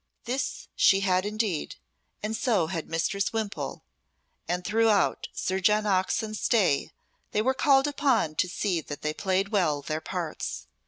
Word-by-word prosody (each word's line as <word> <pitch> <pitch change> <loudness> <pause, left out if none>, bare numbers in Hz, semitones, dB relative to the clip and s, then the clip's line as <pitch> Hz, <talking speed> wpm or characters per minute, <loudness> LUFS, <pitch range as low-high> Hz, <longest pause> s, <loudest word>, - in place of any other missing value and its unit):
This 255 +3 -3
she 195 0 +5
had 185 0 +2
indeed, 210 -6 -2 0.5
and 215 +1 -1
so 220 -6 +2
had 165 -1 -4
Mistress 195 +5 0
Wimpole, 205 - -4 0.6
and 180 +1 -2
throughout 220 -1 +2
Sir 190 +1 -2
John 210 +3 +3
Oxon's 210 +2 0
stay 190 - +2 0.4
they 210 - +2
were 260 +3 +2
called 270 0 +4
upon 275 - +1
to 185 - +1
see 180 -2 -1
that 145 -1 -8
they 150 0 0
played 190 +2 0
well 155 -9 +1
their 155 +2 -3
parts. 170 -1 -4
195 Hz, 150 wpm, -27 LUFS, 175-220 Hz, 0.6 s, she